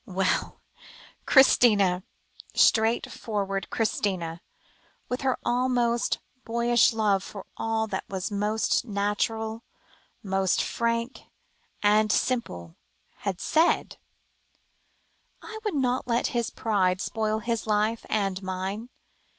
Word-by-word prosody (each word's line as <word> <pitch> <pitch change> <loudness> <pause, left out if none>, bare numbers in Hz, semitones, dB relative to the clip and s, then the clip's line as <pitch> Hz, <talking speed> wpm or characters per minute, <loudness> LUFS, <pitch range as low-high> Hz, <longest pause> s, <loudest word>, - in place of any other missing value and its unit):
Well! 190 -1 -1 0.7
Christina 205 -9 +5 0.5
straightforward 210 -3 +1
Christina, 185 -6 -1 0.7
with 250 - -2
her 265 -2 +1
almost 240 -1 +1 0.3
boyish 235 0 +3
love 210 -4 +1
for 200 -1 -9
all 225 0 -1
that 200 -3 -4
was 190 +2 -3
most 210 +2 0
natural, 220 +1 -2 0.6
most 190 -2 +1
frank 235 +2 -2 0.6
and 210 +1 +4
simple 85 - -1 0.4
had 195 -3 -3
said, 325 +2 +1 1.5
"I 440 0 -8
would 415 -6 -1
not 255 -2 0
let 235 -1 +1
his 235 -2 0
pride 185 -5 0
spoil 215 +1 -1
his 230 0 -3
life, 215 +2 +1
and 195 -3 -1
mine. 190 +5 -4
220 Hz, 100 wpm, -26 LUFS, 195-235 Hz, 1.5 s, Christina